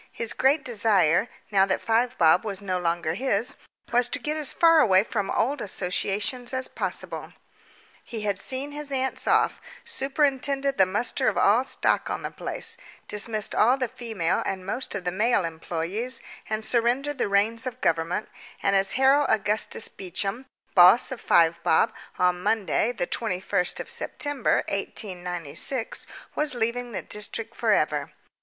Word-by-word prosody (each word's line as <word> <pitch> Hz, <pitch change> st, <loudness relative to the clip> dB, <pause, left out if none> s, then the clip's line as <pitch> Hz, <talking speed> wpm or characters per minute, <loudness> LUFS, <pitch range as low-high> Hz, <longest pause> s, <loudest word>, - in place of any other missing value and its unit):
His 230 Hz, -, -3 dB
great 275 Hz, +2 st, +2 dB
desire, 205 Hz, -4 st, +2 dB, 0.2 s
now 195 Hz, -1 st, +4 dB
that 190 Hz, -, 0 dB
Five 240 Hz, +3 st, 0 dB
Bob 165 Hz, +1 st, +4 dB
was 200 Hz, -3 st, -3 dB
no 185 Hz, -3 st, -2 dB
longer 170 Hz, -2 st, -1 dB
his, 225 Hz, +1 st, -1 dB, 0.4 s
was 245 Hz, 0 st, +3 dB
to -, -, -1 dB
get 300 Hz, +1 st, -3 dB
as 305 Hz, -3 st, 0 dB
far 330 Hz, -1 st, +5 dB
away 195 Hz, -8 st, +5 dB
from 205 Hz, -3 st, -3 dB
old 270 Hz, +2 st, 0 dB
associations 205 Hz, +6 st, -2 dB
as 260 Hz, 0 st, 0 dB
possible. -, -, -2 dB, 0.7 s
He 225 Hz, -3 st, -7 dB
had 200 Hz, -2 st, -1 dB
seen 265 Hz, +5 st, -3 dB
his 295 Hz, -1 st, -7 dB
aunts 265 Hz, -1 st, -2 dB
off, -, -, +2 dB, 0.2 s
superintended 275 Hz, -1 st, 0 dB
the 190 Hz, -, +6 dB
muster 235 Hz, +6 st, 0 dB
of -, -, +1 dB
all 220 Hz, +5 st, +4 dB
stock 265 Hz, -, 0 dB
on -, -, -4 dB
the -, -, -4 dB
place, -, -, -3 dB, 0.3 s
dismissed 215 Hz, 0 st, -2 dB
all 245 Hz, +5 st, +4 dB
the 255 Hz, -2 st, -1 dB
female 220 Hz, -8 st, -2 dB
and 190 Hz, -1 st, -4 dB
most 245 Hz, +5 st, -2 dB
of 195 Hz, -, -4 dB
the 180 Hz, -, -1 dB
male 210 Hz, 0 st, +2 dB
employees, 170 Hz, +9 st, -4 dB, 0.3 s
and 215 Hz, 0 st, -2 dB
surrendered 255 Hz, +4 st, 0 dB
the -, -, 0 dB
reins 220 Hz, +5 st, +1 dB
of 250 Hz, -, -6 dB
government, 165 Hz, +5 st, 0 dB, 0.4 s
and 195 Hz, 0 st, +2 dB
as 195 Hz, 0 st, +3 dB
Harold 270 Hz, +2 st, +4 dB
Augustus 210 Hz, +1 st, +1 dB
Beecham, 200 Hz, +7 st, -4 dB, 0.3 s
boss 180 Hz, +8 st, +7 dB
of 260 Hz, -, -5 dB
Five 170 Hz, 0 st, +3 dB
Bob, 170 Hz, +7 st, +2 dB, 0.2 s
on 180 Hz, 0 st, +1 dB
Monday, 220 Hz, +3 st, +1 dB
the 230 Hz, -7 st, -2 dB
21st 185 Hz, -3 st, -1 dB
of -, -, -4 dB
December 290 Hz, -4 st, -1 dB
1896, 180 Hz, -, -1 dB, 0.3 s
was 300 Hz, -3 st, +2 dB
leaving 240 Hz, +1 st, -2 dB
the -, -, -4 dB
district 210 Hz, +1 st, -4 dB
for -, -, +1 dB
ever. -, -, +1 dB
220 Hz, 160 wpm, -25 LUFS, 190-255 Hz, 0.7 s, boss